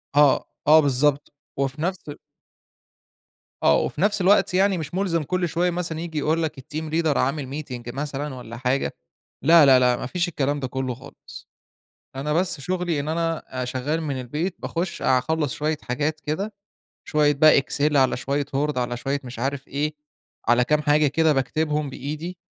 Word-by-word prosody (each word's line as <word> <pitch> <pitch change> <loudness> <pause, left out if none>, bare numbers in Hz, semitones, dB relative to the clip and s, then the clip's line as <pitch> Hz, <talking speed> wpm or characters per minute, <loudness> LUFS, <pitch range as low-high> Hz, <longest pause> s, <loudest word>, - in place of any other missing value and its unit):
آه، 145 -2 +5 0.2
آه 155 +1 +8
بالضبط. 145 +1 +1 0.2
وفي 140 +2 -2
نفس 180 -3 -3
أ - - -4 1.5
آه، - - +5
وفي - - -2
نفس 205 0 +2
الوقت 190 0 +4
يعني 190 0 +3
مش 155 0 -6
مُلزَم 180 -4 0
كل 180 +4 -1
شوية 175 +3 +1
مثلًا 170 -2 -3
ييجي 165 -2 -5
يقول 160 +3 +1
لك 155 -3 -3
الteam 155 +3 -6
leader 160 -3 +2
عامل 140 +1 -1
meeting 120 -3 -7
مثلًا 145 0 -4
والّا 120 -2 -9
حاجة. 130 +2 0 0.5
لا، 160 0 +7
لا، 130 -1 +7
لأ، 125 -1 +3
ما 125 - -5
فيش 175 +6 -1
الكلام 145 -3 -1
ده 130 - -3
كُلّه 130 0 -3
خالص. 130 - -13 0.7
أنا 150 +3 -2
بس 170 -3 0
شغلي 175 -1 -1
إن 140 - -4
أنا 165 0 -1 0.2
أ - - -3
شغّال 130 +6 -2
من 140 -4 -3
البيت، 150 +9 -3
باخُش 170 +1 -3
أخلّص 145 +3 +1
شوية 155 +1 -1
حاجات 150 +5 -2
كده، 175 +8 -3 0.5
شوية 150 -1 +3
بقى 145 0 +6
excel 145 +2 0
على 135 -2 +3
شوية 140 +3 -1
word 150 -1 0
على 120 -1 -1
شوية 135 +4 -2
مش 125 -2 -8
عارف 135 +2 -3
إيه، 150 +2 -2 0.5
على 120 +1 +4
كام 150 +4 +1
حاجة 150 0 +3
كده 155 +2 +3
باكتبهم 150 +2 -1
بإيدي 155 +7 -6
150 Hz, 175 wpm, -23 LUFS, 135-160 Hz, 1.5 s, آه